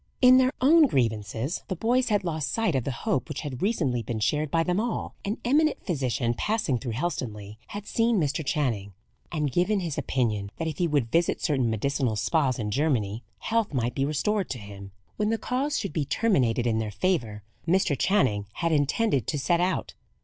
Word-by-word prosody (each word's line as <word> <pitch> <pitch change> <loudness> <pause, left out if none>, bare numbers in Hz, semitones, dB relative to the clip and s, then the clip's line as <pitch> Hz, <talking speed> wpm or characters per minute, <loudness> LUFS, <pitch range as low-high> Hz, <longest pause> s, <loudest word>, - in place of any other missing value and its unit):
In 255 0 +7
their 260 0 +3
own 305 +3 +6
grievances 115 - -1
the 185 - -2
boys 245 +7 +1
had 205 -2 +2
lost 155 -4 -2
sight 225 -7 +1
of 130 -4 0
the 140 - -1
hope 135 - 0
which 150 - -4
had 135 -4 -6
recently 155 - +1
been 110 0 -4
shared 150 +8 0
by 165 +2 +2
them 180 +3 0
all. 235 +1 -2
An 205 +3 -2
eminent 300 +5 +2
physician, 130 - 0
passing 210 - 0
through 120 -2 -4
Helstonleigh, 110 -8 -4
had 205 0 -7
seen 230 -1 +2
Mr. 155 0 0
Channing, 115 -10 -1 0.4
and 150 -4 -1
given 190 - +2
his 165 -5 -3
opinion 105 -6 -1
that 165 - -2
if 155 - -4
he 175 - +2
would 140 -7 0
visit 170 +1 +2
certain 135 -7 +1
medicinal 120 +1 0
spas 135 +2 +1
in 105 -2 -3
Germany, 120 -6 0 0.2
health 225 -8 0
might 120 -1 0
be 135 - -1
restored 185 +8 0
to 130 - -3
him. 100 -2 -10 0.3
When 210 0 +1
the 225 - +1
cause 270 +6 -1
should 200 - -3
be 150 -4 0
terminated 130 - +1
in 110 -2 +1
their 110 -1 -2
favour, 115 - -1 0.2
Mr. 175 -3 +3
Channing 125 - +1
had 170 -1 -1
intended 145 - +1
to - - -1
set 170 +5 +1
out. 180 -6 -1
150 Hz, 195 wpm, -26 LUFS, 120-195 Hz, 0.4 s, In